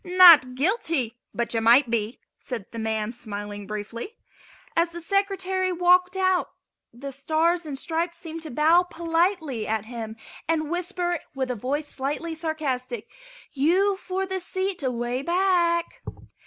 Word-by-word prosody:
"Not 350 Hz, -8 st, +8 dB
guilty, 280 Hz, -, 0 dB
but 235 Hz, 0 st, -2 dB
you 225 Hz, -, +1 dB
might 235 Hz, +2 st, +5 dB
be," 225 Hz, +1 st, -1 dB, 0.2 s
said 230 Hz, -7 st, -6 dB
the 230 Hz, -, -6 dB
man, 220 Hz, 0 st, -2 dB
smiling 205 Hz, -3 st, -6 dB
briefly. 220 Hz, -, -6 dB, 0.6 s
As 335 Hz, +1 st, +3 dB
the 340 Hz, 0 st, -8 dB
Secretary 380 Hz, 0 st, 0 dB
walked 360 Hz, +1 st, +3 dB
out 375 Hz, -1 st, +2 dB, 0.4 s
the 275 Hz, +4 st, -8 dB
Stars 320 Hz, +5 st, 0 dB
and 280 Hz, -2 st, -4 dB
Stripes 335 Hz, +4 st, -2 dB
seemed 330 Hz, -1 st, -7 dB
to 315 Hz, -, -6 dB
bow 310 Hz, +6 st, +4 dB
politely 330 Hz, -, -1 dB
at 220 Hz, -1 st, -1 dB
him 225 Hz, -2 st, -6 dB, 0.3 s
and 315 Hz, -1 st, 0 dB
whisper 350 Hz, -1 st, -1 dB, 0.2 s
with 260 Hz, -1 st, -1 dB
a -, -, -2 dB
voice 280 Hz, +7 st, -2 dB
slightly 295 Hz, +5 st, -3 dB
sarcastic: 265 Hz, -8 st, -3 dB, 0.4 s
"You 365 Hz, +8 st, +2 dB
for 380 Hz, 0 st, -3 dB
the 380 Hz, 0 st, -3 dB
seat 375 Hz, 0 st, -3 dB
away 245 Hz, -1 st, -2 dB
back!" 345 Hz, 0 st, +1 dB
315 Hz, 140 wpm, -25 LUFS, 245-355 Hz, 0.6 s, Not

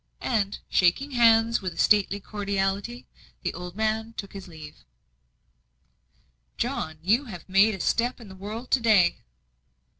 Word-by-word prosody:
And, 210 Hz, -4 st, 0 dB
shaking 190 Hz, +11 st, +2 dB
hands 230 Hz, -2 st, +4 dB
with 185 Hz, -2 st, -4 dB
a -, -, -18 dB
stately 205 Hz, -1 st, +3 dB
cordiality, 200 Hz, +3 st, -3 dB, 0.4 s
the -, -, -2 dB
old 180 Hz, 0 st, -8 dB
man 220 Hz, +1 st, -1 dB
took 200 Hz, -, -7 dB
his 195 Hz, -1 st, -9 dB
leave. 155 Hz, -3 st, -11 dB, 1.8 s
"John, 160 Hz, 0 st, -3 dB
you 225 Hz, +10 st, +2 dB
have 180 Hz, -9 st, -10 dB
made 195 Hz, +3 st, +4 dB
a -, -, -10 dB
step 240 Hz, +7 st, 0 dB
in 230 Hz, -, -12 dB
the 190 Hz, -, -11 dB
world 215 Hz, +6 st, -7 dB
to 265 Hz, -, +4 dB
day." 215 Hz, -7 st, +4 dB
205 Hz, 145 wpm, -26 LUFS, 190-230 Hz, 1.8 s, hands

